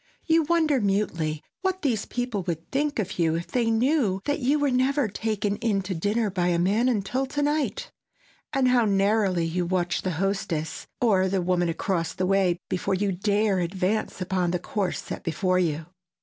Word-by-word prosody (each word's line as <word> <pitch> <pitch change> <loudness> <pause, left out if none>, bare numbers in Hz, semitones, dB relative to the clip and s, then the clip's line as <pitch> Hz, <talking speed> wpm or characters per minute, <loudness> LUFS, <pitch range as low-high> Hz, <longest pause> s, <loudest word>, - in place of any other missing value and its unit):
You 325 0 +4
wonder 310 -4 +2
mutely 170 -7 -1 0.2
what 375 0 -1
these 235 -7 0
people 245 -5 -2
would 165 -1 -4
think 290 +2 0
of 195 -4 -3
you 165 -1 +2
if 170 +1 -3
they 235 -2 0
knew 225 -4 +2
that 290 +1 0
you 275 +3 +2
were 290 -2 +1
never 260 +1 +2
"taken 205 0 -2
in" 205 -4 0
to 190 +1 -3
dinner 205 +5 0
by 180 -2 0
a 175 -1 +2
man 205 +8 +2
until 250 +4 -1
to 290 +2 -2
night, 300 - -1 0.6
and 270 -3 +2
how 245 -2 +4
narrowly 195 -3 +2
you 175 +2 -1
watch 175 0 0
the 185 - -2
hostess, 180 -5 -2
or 190 -6 +3
the 195 0 +1
woman 175 -1 +1
across 165 0 -1
the 185 - 0
way 190 -2 +2
before 190 +1 -1
you 200 +1 0
dare 200 +1 +1
advance 185 +5 -1
upon 185 -1 0
the 180 - 0
course 190 +1 -2
set - - -6
before 185 +3 +1
you. 160 -3 -1
200 Hz, 185 wpm, -26 LUFS, 180-245 Hz, 0.6 s, You